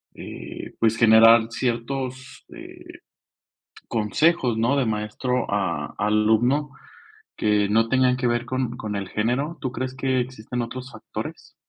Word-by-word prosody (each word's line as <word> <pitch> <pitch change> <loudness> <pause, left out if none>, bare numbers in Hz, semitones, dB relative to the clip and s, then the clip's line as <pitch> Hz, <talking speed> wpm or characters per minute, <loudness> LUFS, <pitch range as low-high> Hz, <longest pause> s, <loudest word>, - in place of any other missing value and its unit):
eh, - - -9
pues, 115 0 +3
generar 115 0 +7
ciertos, 130 +2 -4
eh, 350 +1 -12 1.0
consejos?, 120 - +1
¿no?, 120 +5 +2
de 135 - +2
maestro 110 +4 -2
a 85 -7 -2
alumno, 110 +7 +2 0.7
que 105 -1 +2
no 115 +2 +2
tengan 130 0 +3
que 125 - -1
ver 120 0 0
con 130 -1 -2
con 105 -1 -4
el 100 -2 -4
género, 135 +9 -1
¿tú 130 - -2
crees 130 0 -4
que 130 -1 0
existen 125 -1 -5
otros 125 +2 -7
factores? 110 - -8
120 Hz, 135 wpm, -23 LUFS, 110-130 Hz, 1.0 s, generar